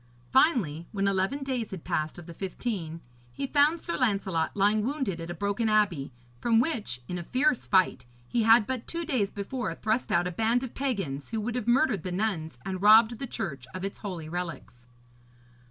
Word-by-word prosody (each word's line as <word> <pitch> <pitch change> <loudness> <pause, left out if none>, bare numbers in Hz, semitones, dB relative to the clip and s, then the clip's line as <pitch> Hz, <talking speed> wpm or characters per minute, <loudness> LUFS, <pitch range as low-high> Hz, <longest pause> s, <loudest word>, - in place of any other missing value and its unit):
Finally, 185 - +3
when 200 -2 0
eleven 195 +9 0
days 255 -5 -2
had 185 -4 -7
passed 155 0 -2
of 175 - -10
the 170 - -9
fifteen, 180 -3 -4 0.3
he 275 - -4
found 290 +4 +3
Sir 340 - -4
Lancelot 195 - 0
lying 205 +2 +3
wounded 245 - -2
at 165 - -6
a 175 - -4
broken 205 +5 0
abbey, 195 -11 +2 0.3
from 225 - +3
which, 230 - -1
in 180 0 -3
a - - -5
fierce 255 +4 +1
fight, 185 -9 +2 0.2
he 240 - 0
had 225 0 +6
but 255 -1 -4
two 340 0 -3
days 250 - 0
before 200 -2 -4
thrust 220 +6 -1
out 175 +1 +3
a 180 - -2
band 225 +7 +1
of 255 - -6
pagans, 195 - -3
who 225 - -2
would 225 +3 -2
have 245 -2 -3
murdered 245 -3 +3
the 185 - -5
nuns 180 -5 -2
and 190 -1 -3
robbed 220 +2 +6
the 270 - -4
church 140 - -5
of 185 +1 -4
its 195 - -5
holy 175 -6 -5
relics. 165 -8 -6
205 Hz, 195 wpm, -28 LUFS, 175-245 Hz, 0.3 s, had